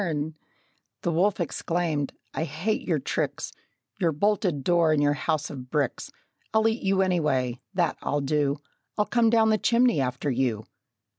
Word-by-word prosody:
Then 160 -4 -2 0.7
the 170 - +1
wolf 190 +5 +2
exclaimed, 165 -3 -1 0.2
"I - - -1
hate 175 +9 -1
your 165 -4 +2
tricks, 135 - -2 0.5
Your 170 -3 +2
bolted 185 - +1
door 170 -1 +3
and 150 -1 +3
your 145 0 +3
house 155 +1 -1
of 130 -3 -8
bricks! 145 -4 -1 0.5
I'll 220 0 +5
eat 225 +2 0
you 195 0 +2
anyway 135 -9 0 0.2
that 175 -3 +1
I'll 145 - -1
do! 145 0 +1 0.4
I'll 210 - +3
come 235 0 +3
down 220 -1 +4
the 215 - +2
chimney 235 - +3
after 130 +2 -1
you!" 120 -4 0
160 Hz, 160 wpm, -26 LUFS, 145-195 Hz, 0.7 s, I'll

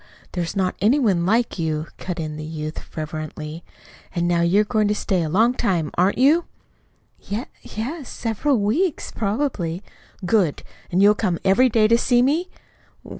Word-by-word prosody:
There's 175 0 -3
not 185 -2 +1
any 225 +8 +4
one 190 -10 +2
like 230 -1 +1
you," 155 -1 -1
cut 180 -2 -5
in 155 -1 -4
the 155 - -6
youth 155 0 -5
fervently. 155 0 -6 0.5
"And 170 0 +1
now 175 -1 +2
you're 185 +5 +4
going 215 -1 +1
to 210 - +1
stay 190 -3 0
a 160 - -2
long 225 +9 +3
time, 180 -11 0
aren't 185 +3 +2
you?" 300 +7 +4 0.9
"Y 220 +5 -2 0.2
yes, 265 +6 -6
several 240 +5 0
weeks, 285 - 0
probably." 205 - -2 0.4
"Good! 180 -6 +1 0.3
And 185 +2 +3
you'll 205 +1 +7
come 190 -5 -1
every 210 +7 +5
day 215 -2 +4
to 230 +1 +4
see 245 0 +3
me?" 320 +7 +1
200 Hz, 165 wpm, -22 LUFS, 170-235 Hz, 0.9 s, you'll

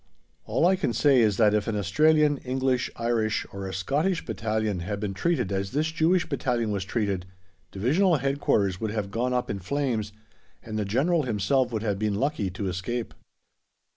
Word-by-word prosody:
All - - +1
I 190 +2 +5
can 180 -10 -1
say 135 +3 +4
is 105 -4 +3
that 105 -2 +4
if 105 -1 0
an 115 - -1
Australian, 150 - +3
English, 130 0 0
Irish, 115 -2 0
or 100 -1 -5
a - - -5
Scottish 150 - 0
battalion 110 -2 -1
had 100 +4 -4
been 100 -2 -3
treated 100 - 0
as 95 +1 -2
this 155 +3 0
Jewish 165 +2 +2
battalion 120 -5 -1
was 100 -2 -1
treated, 100 -4 -2 0.4
Divisional 160 - +2
Headquarters 125 -9 0
would 110 - -1
have 105 -2 -3
gone 120 +4 -1
up 125 0 0
in 100 - -4
flames 115 0 -2 0.5
and 110 -2 -4
the 105 - -1
General 145 - +2
himself 125 +1 +1
would 110 -2 -2
have 100 -3 -1
been 105 -1 0
lucky 125 -4 -1
to 95 +2 -4
escape. 100 +6 -3
115 Hz, 180 wpm, -26 LUFS, 100-140 Hz, 0.5 s, I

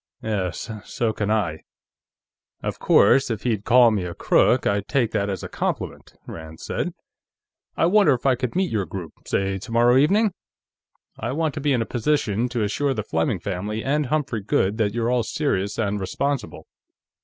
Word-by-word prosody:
"Yes, 100 -2 -2
so 115 -2 -1
can 105 -1 -2
I. 100 -8 0 1.0
Of - - -3
course, 135 -1 +4
if 115 -3 -3
he'd 110 -5 0
call 120 -1 +6
me 105 -4 0
a 85 -1 -5
crook, - - +3
I'd 100 -1 0
take 120 -5 +1
that 100 0 0
as 95 -3 -4
a - - -4
compliment," - - -4
Rand 80 -1 -9
said. - - -3 0.8
"I - - +3
wonder 180 -5 +5
if 125 - -10
I 135 - +5
could 125 +1 -3
meet 185 0 +1
your 100 -5 -1
group, 90 -1 -7
say 95 0 0
tomorrow 120 +3 +3
evening? 200 +8 +3 0.9
I 120 +3 -3
want 155 0 0
to 145 - -5
be 145 0 +1
in 120 -4 +2
a - - -8
position 120 -3 0
to 120 -3 -1
assure 135 +7 0
the 110 - -2
Fleming 80 -4 -1
family 105 +5 -3
and 145 +1 0
Humphrey 135 -6 -1
Goode 100 +1 0
that 105 -1 +1
you're 120 0 0
all 125 -1 +2
serious 105 -7 -1
and 105 -2 -1
responsible." 140 +8 -3
115 Hz, 180 wpm, -23 LUFS, 100-135 Hz, 1.0 s, call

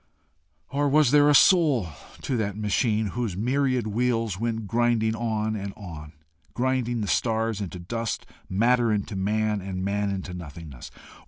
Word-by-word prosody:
Or 145 +1 +1
was 145 -2 +4
there 145 0 +6
a 145 - +5
soul 145 - +5 0.3
to 130 - -1
that 105 -3 -2
machine 110 +1 +1
whose 115 -7 -2
myriad 130 +1 +1
wheels 115 -2 0
went 115 -1 -2
grinding 115 0 +1
on 110 -1 -1
and 100 -1 -5
on, 80 -7 -9 0.4
grinding 125 -2 0
the 105 - -2
stars 110 0 0
into 95 -2 -5
dust, 115 +5 -4 0.2
matter 115 +4 +3
into 105 -1 -2
man, 105 +2 0
and 95 0 -4
man 100 0 0
into 95 -2 -4
nothingness? 80 -6 -9
110 Hz, 150 wpm, -25 LUFS, 100-120 Hz, 0.4 s, there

